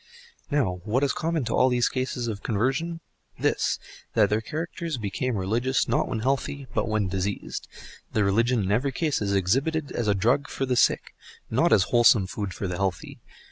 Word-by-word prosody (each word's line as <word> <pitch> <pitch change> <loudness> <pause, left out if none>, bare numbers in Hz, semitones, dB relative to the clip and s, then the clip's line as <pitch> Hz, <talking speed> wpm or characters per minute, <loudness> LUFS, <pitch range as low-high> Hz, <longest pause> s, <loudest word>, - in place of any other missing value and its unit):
Now, 110 - 0
what 120 +7 0
is 140 - +2
common 160 -4 -1
to 115 - -2
all 130 - +4
these 125 -1 +2
cases 130 -2 -2
of 105 -3 -4
conversion? 135 +10 -1 0.4
This: - - +1 0.4
that 105 -3 +4
the 105 +1 +2
characters 165 +3 -4
become 115 +3 -2
religious, 115 +8 0
not - - +1
when 110 - -3
healthy, 135 +2 -1
but - - 0
when 110 -2 +1
diseased; 95 +2 -3 0.4
the 105 - +2
religion 115 +4 +2
in 95 - -1
every 130 +6 +1
case 155 -2 0
is 100 -1 0
exhibited 140 - +1
as 120 - -2
a 100 - +3
drug 125 +9 +2
for 135 - -2
the 125 -1 0
sick, - - +2 0.4
not 155 +9 +3
as 100 - +6
wholesome 120 -4 +6
food 100 +1 -4
for 100 - -4
the 90 -1 -3
healthy. 95 -4 -3
120 Hz, 185 wpm, -26 LUFS, 100-135 Hz, 0.4 s, as